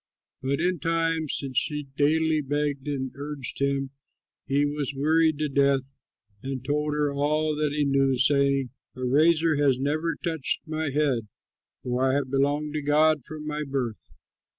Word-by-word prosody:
But 140 +2 -1
in 180 0 0
time, 165 0 0
since 130 -2 0
she 150 -1 -2
daily 155 +2 +2
begged 145 0 -2
and 130 -3 -2
urged 140 -3 -6
him, 140 -1 0 0.6
he 140 +1 +2
was 145 -1 -3
wearied 155 +2 +3
to 155 0 0
death, 140 -1 +1 0.5
and 130 0 -5
told 150 +1 0
her 145 -1 0
all 150 +2 +1
that 150 -1 0
he 150 0 0
knew, 135 -1 +2
saying, 140 -1 +2 0.2
"A 130 - -6
razor 155 +4 +3
has 140 -3 +3
never 155 +5 -1
touched 160 -5 -2
my 155 -1 -2
head; 135 -6 0 0.6
for 125 +1 -1
I 130 0 +3
have 140 -2 -1
belonged 145 +2 0
to 155 - -2
God 150 0 +3
from 155 0 -7
my 150 0 -3
birth. 130 -6 -4
145 Hz, 160 wpm, -26 LUFS, 135-155 Hz, 0.6 s, wearied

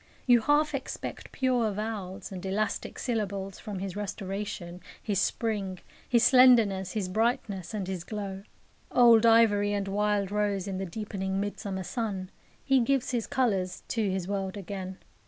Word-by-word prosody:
You 245 -2 +6
half 295 +4 +2
expect 265 -1 -5
pure 250 -4 +1
vowels 205 -3 -5
and 185 -2 -7
elastic 200 +2 -2
syllables 200 -5 -3
from 210 -2 -6
his 190 -1 -4
restoration, 195 -3 -5 0.2
his 200 -3 0
spring, 205 -5 -1 0.3
his 235 -1 +4
slenderness, 230 -8 +5
his 205 -4 -1
brightness, 210 -2 -1
and 205 -4 -3
his 185 -3 -4
glow. 195 -1 -5 0.5
Old 235 -2 +6
ivory 205 -3 +5
and 200 -1 -1
wild 205 0 0
rose 205 -2 0
in 190 -1 -3
the 190 - -3
deepening 190 0 -3
midsummer 200 -1 -3
sun, 190 -1 -3 0.3
he 270 -1 +4
gives 260 +1 +1
his 240 -3 -1
colours 195 -8 0
to 220 -4 0
his 185 -1 -2
world 195 0 -3
again. 190 -1 -6
205 Hz, 150 wpm, -28 LUFS, 190-225 Hz, 0.5 s, You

